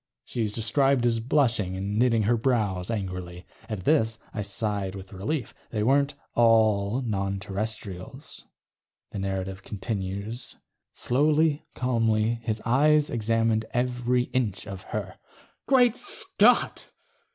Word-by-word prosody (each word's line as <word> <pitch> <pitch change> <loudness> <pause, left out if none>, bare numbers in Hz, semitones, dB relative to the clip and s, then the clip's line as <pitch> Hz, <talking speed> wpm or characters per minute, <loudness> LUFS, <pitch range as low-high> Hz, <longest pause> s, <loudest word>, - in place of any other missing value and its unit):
She 120 - -4
is 105 -2 0
described 120 +4 +2
as 115 -1 +2
blushing 115 -7 +1
and 100 +3 -2
knitting 115 -3 +3
her 115 +4 +3
brows 110 -7 0
angrily. 90 -5 -4 0.2
At 105 -4 -4
this, 110 -4 +2 0.2
I 105 - -3
sighed 100 -1 -2
with 95 0 -10
relief. 115 +7 -3 0.2
They 105 -2 -1
weren't 140 +4 +2 0.2
all 110 0 +3
non 100 -4 -2
Terrestrials. 100 -1 -6 0.7
The - - -5
narrative 95 0 -3
continues:... 100 +2 -5 0.4
slowly, 150 +3 +1
calmly, 115 -2 +1
his 110 -1 -3
eyes 150 +5 +3
examined 115 -1 +1
every 125 0 +1
inch 115 -7 -1
of 95 -1 -7
her. - - -5 0.5
Great 250 -3 +5
Scott! 405 +9 +2
110 Hz, 120 wpm, -26 LUFS, 100-125 Hz, 0.7 s, Great